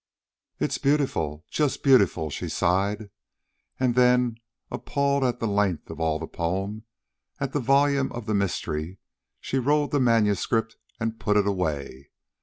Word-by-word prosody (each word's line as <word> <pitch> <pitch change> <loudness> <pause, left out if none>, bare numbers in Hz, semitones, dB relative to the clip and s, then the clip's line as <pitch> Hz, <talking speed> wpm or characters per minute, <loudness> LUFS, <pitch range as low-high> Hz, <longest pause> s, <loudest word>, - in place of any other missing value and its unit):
"It's - - -1
beautiful, 90 - 0
just 150 -3 0
beautiful," 100 - +4
she - - -4
sighed. 100 +4 0 0.7
And 125 -2 +2
then, 125 -1 +3 0.3
appalled 140 -1 0
at 125 -1 0
the - - -2
length 100 -6 0
of 80 - -9
all 80 -1 +1
the 80 - -5
poem, 95 +7 -3 0.5
at 135 -1 -3
the 145 - +1
volume 140 +1 +2
of 120 -2 -6
the 110 - -1
mystery, 90 -3 -2 0.4
she 135 - -2
rolled 145 +3 +1
the 145 - +2
manuscript 115 -1 +2 0.2
and 115 -1 -3
put 105 -1 +1
it 105 - +3
away. 75 -8 -3
110 Hz, 145 wpm, -25 LUFS, 90-130 Hz, 0.7 s, beautiful